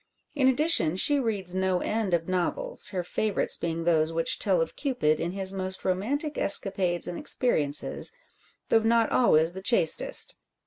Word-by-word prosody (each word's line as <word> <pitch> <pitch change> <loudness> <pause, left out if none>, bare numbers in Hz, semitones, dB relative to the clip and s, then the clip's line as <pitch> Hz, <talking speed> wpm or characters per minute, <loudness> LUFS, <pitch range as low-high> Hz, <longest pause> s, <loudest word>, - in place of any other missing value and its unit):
In 275 -3 +1
addition 260 - +2
she 285 +9 +2
reads 205 -8 -2
no 190 -1 0
end 210 -1 -1
of 165 -1 -4
novels, 185 - -2
her 185 -3 -4
favourites 205 +3 0
being 165 0 -4
those 160 -2 +1
which 165 0 -1
tell 190 -4 +1
of 165 - -3
Cupid 165 - -1
in 170 +2 -4
his 190 -1 -1
most 190 -1 -3
romantic 270 - -2
escapades 190 -3 +1
and 175 - -6
experiences, 150 - +1 0.6
though 225 - +4
not 225 0 +1
always 165 -8 +2
the 190 - -8
chastest. 195 -6 +2
190 Hz, 160 wpm, -26 LUFS, 170-230 Hz, 0.6 s, though